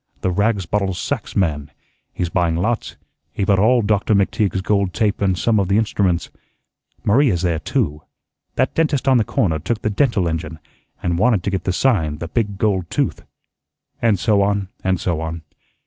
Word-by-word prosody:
the 95 Hz, -, 0 dB
rags 100 Hz, 0 st, +1 dB
bottles 95 Hz, 0 st, -1 dB
sacks -, -, -4 dB
man; 75 Hz, -6 st, 0 dB, 0.4 s
he's 90 Hz, -, -2 dB
buying 85 Hz, -1 st, +1 dB
lots; 110 Hz, +7 st, -1 dB, 0.4 s
he -, -, -2 dB
bought 95 Hz, -1 st, +3 dB
all 120 Hz, +3 st, +4 dB
Doctor 105 Hz, +1 st, +2 dB
McTeague's 100 Hz, -1 st, +1 dB
gold 100 Hz, -3 st, 0 dB
tape 105 Hz, -2 st, 0 dB
and 95 Hz, -2 st, +1 dB
some 110 Hz, +1 st, +2 dB
of 95 Hz, -, +1 dB
the 100 Hz, +2 st, +2 dB
instruments. 95 Hz, -6 st, 0 dB, 0.7 s
Maria's 105 Hz, -, +3 dB
there 85 Hz, -3 st, +1 dB
too. 80 Hz, -, -1 dB, 0.5 s
That -, -, +1 dB
dentist 150 Hz, -4 st, 0 dB
on 130 Hz, -1 st, +5 dB
the 115 Hz, -, +3 dB
corner 100 Hz, -, 0 dB
took 105 Hz, +8 st, -3 dB
the 110 Hz, -, 0 dB
dental 105 Hz, -5 st, +1 dB
engine, 80 Hz, -1 st, -4 dB, 0.5 s
and 85 Hz, -1 st, 0 dB
wanted 110 Hz, -4 st, +3 dB
to 100 Hz, -, -1 dB
get 95 Hz, -, -3 dB
the 95 Hz, -, +1 dB
sign, 90 Hz, -, +1 dB
the 85 Hz, -, -5 dB
big 100 Hz, +2 st, -2 dB
gold 95 Hz, -5 st, 0 dB
tooth," -, -, -1 dB, 0.8 s
and 115 Hz, -4 st, +3 dB
so 100 Hz, +1 st, +2 dB
on 100 Hz, -1 st, 0 dB
and 95 Hz, -1 st, +1 dB
so 85 Hz, -3 st, -1 dB
on. 80 Hz, 0 st, -5 dB
100 Hz, 180 wpm, -20 LUFS, 85-110 Hz, 0.8 s, on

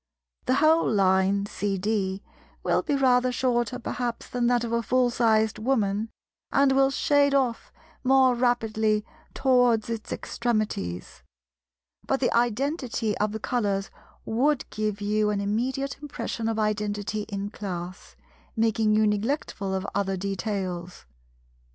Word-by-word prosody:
The 255 Hz, -, +3 dB
whole 315 Hz, 0 st, +4 dB
line 195 Hz, 0 st, +3 dB
(CD) 200 Hz, -1 st, -2 dB, 0.4 s
will -, -, +2 dB
be 300 Hz, -4 st, -1 dB
rather 255 Hz, -2 st, +3 dB
shorter 245 Hz, -1 st, 0 dB
perhaps 240 Hz, 0 st, -4 dB
than 245 Hz, -1 st, 0 dB
that 245 Hz, -1 st, +2 dB
of 235 Hz, -, -3 dB
a 235 Hz, 0 st, +1 dB
full 245 Hz, +3 st, +2 dB
sized 220 Hz, -3 st, +2 dB
Woman, 215 Hz, -3 st, 0 dB, 0.4 s
and 275 Hz, -1 st, +4 dB
will 270 Hz, 0 st, +4 dB
shade 285 Hz, 0 st, +2 dB
off 255 Hz, -4 st, 0 dB, 0.3 s
more 260 Hz, -1 st, +5 dB
rapidly 220 Hz, -3 st, +1 dB, 0.3 s
towards 245 Hz, -4 st, +3 dB
its 225 Hz, -2 st, -5 dB
extremities; 205 Hz, -, -3 dB, 0.9 s
but 270 Hz, -, +1 dB
the 245 Hz, -, +1 dB
identity 240 Hz, -1 st, 0 dB
of 210 Hz, 0 st, +1 dB
the 220 Hz, -, -4 dB
colours 205 Hz, -4 st, -1 dB, 0.3 s
would 265 Hz, +5 st, +1 dB
give 215 Hz, -1 st, -2 dB
you 210 Hz, +1 st, +1 dB
an 205 Hz, -1 st, 0 dB
immediate 250 Hz, +8 st, -2 dB
impression 245 Hz, -5 st, -4 dB
of 225 Hz, -, -2 dB
identity 210 Hz, -1 st, -1 dB
in 200 Hz, 0 st, -4 dB
Class, 185 Hz, -3 st, -7 dB, 0.4 s
making 225 Hz, -1 st, +2 dB
you 215 Hz, 0 st, +4 dB
neglectful 210 Hz, -1 st, -1 dB
of 190 Hz, 0 st, -2 dB
other 195 Hz, -1 st, -1 dB
details. 190 Hz, -2 st, -4 dB
220 Hz, 130 wpm, -26 LUFS, 205-250 Hz, 0.9 s, more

